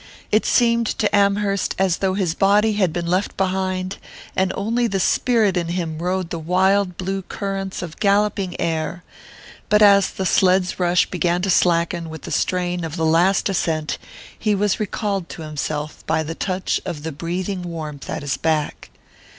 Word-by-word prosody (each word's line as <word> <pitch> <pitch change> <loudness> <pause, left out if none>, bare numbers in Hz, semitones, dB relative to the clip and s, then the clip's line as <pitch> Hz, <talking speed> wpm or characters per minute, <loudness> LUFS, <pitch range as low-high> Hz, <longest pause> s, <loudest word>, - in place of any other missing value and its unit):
It 215 - +3
seemed 235 -2 +3
to 210 - +1
Amherst 200 -1 +1
as 190 -3 +2
though 190 -1 0
his 185 -5 0
body 210 +4 +3
had 190 -5 +1
been 170 +1 -3
left 185 +4 -1
behind, 185 0 -1 0.4
and 190 0 +1
only 230 +4 0
the 195 -3 -1
spirit 220 -1 +2
in 175 -2 0
him 170 -2 -3
rode 180 0 -2
the 170 - -3
wild 185 +2 +2
blue 195 +1 -2
currents 195 0 -4
of 165 -3 -8
galloping 200 -2 +1
air; 165 +1 -2 0.7
but 210 0 +5
as 200 -1 +6
the 190 - -4
sled's 185 0 +2
rush 175 0 +3
began 175 0 -1
to 195 - +1
slacken 170 -1 +2
with 160 0 -9
the - - -7
strain 180 -1 0
of 160 -1 -4
the 160 -2 0
last 175 +5 +3
ascent 160 -5 -1 0.4
he 210 -2 +1
was 205 +1 +1
recalled 200 -3 -2
to 165 - -8
himself 150 0 -4
by 160 - +1
the 160 +1 -4
touch 185 +2 -2
of 150 -3 -5
the 160 - -3
breathing 180 +5 -3
warmth 155 -5 -6
at - - -4
his 140 -1 -1
back. 155 -2 -1
185 Hz, 175 wpm, -21 LUFS, 170-200 Hz, 0.7 s, as